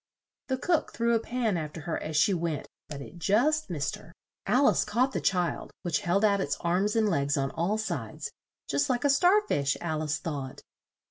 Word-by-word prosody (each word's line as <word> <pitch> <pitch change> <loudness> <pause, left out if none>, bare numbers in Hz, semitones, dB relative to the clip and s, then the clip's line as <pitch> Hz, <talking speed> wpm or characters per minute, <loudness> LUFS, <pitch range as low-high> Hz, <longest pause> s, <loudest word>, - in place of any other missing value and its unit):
The 260 - 0
cook 330 +4 0
threw 235 0 +1
a 230 - +3
pan 230 -4 -1
after 155 0 -5
her 165 +2 -3
as 155 -1 -3
she 200 +6 +4
went, 165 -4 -2 0.2
but 145 -2 -7
it 175 - -12
just 260 - +2
missed 145 -5 -2
her. - - -15 0.4
Al 275 +3 +4
ice - - +3
caught 250 +5 +1
the - - -2
child, 180 -3 0
which 175 0 0
held 200 +1 +2
out 200 -2 +3
its 145 - -1
arms 185 +5 +1
and 220 -1 +3
legs 145 -5 +1
on 135 0 0
all 175 +8 0
sides, 220 - -4 0.4
"just 285 0 +1
like 245 -1 0
a 285 - +5
star 360 +9 +5
fish," 140 -1 +1
Al 155 -2 -2
ice 155 0 -1
thought. 140 -5 -5
190 Hz, 205 wpm, -28 LUFS, 155-235 Hz, 0.4 s, a